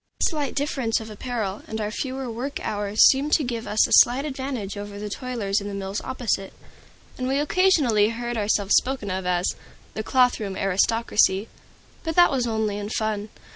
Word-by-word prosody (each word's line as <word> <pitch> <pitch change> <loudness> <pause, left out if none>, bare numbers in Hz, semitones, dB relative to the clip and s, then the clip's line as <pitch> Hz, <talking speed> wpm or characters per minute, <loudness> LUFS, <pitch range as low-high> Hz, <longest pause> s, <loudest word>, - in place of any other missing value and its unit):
This - - +3
slight 295 -3 -3
difference 270 -5 0
of 220 -1 -9
apparel 215 -3 -4
and 220 - -4
our 210 -1 -2
fewer 265 +2 -4
work 245 +5 -4
hours 205 0 +3
seemed 280 +3 +3
to 310 - +4
give 235 -3 -4
us 215 - +3
a - - -11
slight 255 +4 +6
advantage 260 -8 -4
over 205 0 -7
the 205 0 -6
toilers 220 -5 -2
in 200 - -6
the 200 - -5
mills 195 +1 -4
opposite, 230 -7 -2 0.7
and 255 - -2
we 270 +1 +1
occasionally 290 - +3
heard 240 +1 -4
ourselves 205 -2 +1
spoken 255 -7 -1
of 185 0 -3
as 180 0 +1 0.4
"the - - -3
cloth 250 +2 +2
room 195 -3 -4
aristocracy." 200 +1 +2 0.5
But 325 -1 -3
that 350 0 +6
was 255 -3 0
only 220 -2 -1
in 205 0 -5
fun. 215 -1 -2
225 Hz, 185 wpm, -24 LUFS, 205-260 Hz, 0.7 s, slight